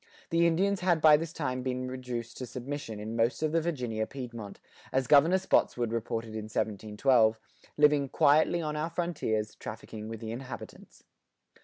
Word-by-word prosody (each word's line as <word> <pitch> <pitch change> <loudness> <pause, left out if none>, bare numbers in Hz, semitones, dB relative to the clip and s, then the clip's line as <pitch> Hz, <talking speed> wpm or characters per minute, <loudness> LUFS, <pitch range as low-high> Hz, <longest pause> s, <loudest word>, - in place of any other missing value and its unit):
The 170 0 +4
Indians 190 +4 +1
had 180 -3 +2
by 155 -1 +8
this 160 +1 -2
time 130 -6 -3
been 130 0 -3
reduced 125 -2 -5
to 125 - -5
submission 125 -3 -6
in 110 +2 -5
most 115 +6 +1
of 155 - +1
the 165 +1 +2
Virginia 125 -10 -2
Piedmont 120 -6 -8 0.3
as 130 0 +1
Governor 150 +7 +6
Spotswood[88:3] 120 -10 +1
reported 115 0 -3
in 110 -1 -5
1712, 110 +2 +2 0.4
living 150 -2 +4
"quietly 155 +5 +3
on 150 -1 -2
our 155 +2 -2
frontiers, 145 -11 -2
trafficking 110 0 -8
with 115 -1 -6
the 110 -1 -6
Inhabitants." 125 +2 -9
130 Hz, 160 wpm, -29 LUFS, 115-155 Hz, 0.4 s, by